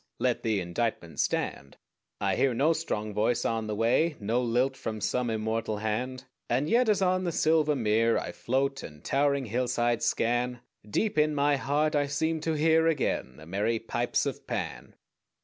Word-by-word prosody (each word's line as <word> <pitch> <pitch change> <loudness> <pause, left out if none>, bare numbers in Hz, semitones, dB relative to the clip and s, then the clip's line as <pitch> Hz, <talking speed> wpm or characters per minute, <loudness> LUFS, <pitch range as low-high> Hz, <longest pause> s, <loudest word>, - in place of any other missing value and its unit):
Let 125 0 0
the 110 -3 0
indictment 85 -3 -3
stand. 70 0 -2 0.4
I - - +1
hear 130 -3 +2
no 150 +7 +3
strong 110 -10 -3
voice 110 +3 +1
on 115 -1 -1
the 105 - -2
way, 125 +9 +2
No 115 +4 0
lilt 125 +3 +1
from 110 -4 -5
some 125 +3 0
immortal 110 0 -1
hand; 125 +5 -3 0.2
And 130 +5 +1
yet 240 +5 +3
as 205 -2 +3
on 185 0 +2
the 175 - -1
silver 155 -2 +2
mere 115 -1 +2
I - - -3
float, 135 +2 -1
and 75 -1 -11
towering 140 -1 +1
hillsides 120 0 0
scan, 120 +1 0 0.3
Deep 200 - 0
in 150 0 +2
my 145 0 +3
heart 150 +3 0
I 145 -1 +2
seem 160 +3 0
to 160 +1 -1
hear 160 +1 +3
Again 140 - -1
the 80 - -12
merry 105 +7 0
pipes 120 +2 -1
of - - -5
Pan. 60 +2 -4
125 Hz, 175 wpm, -28 LUFS, 110-150 Hz, 0.4 s, no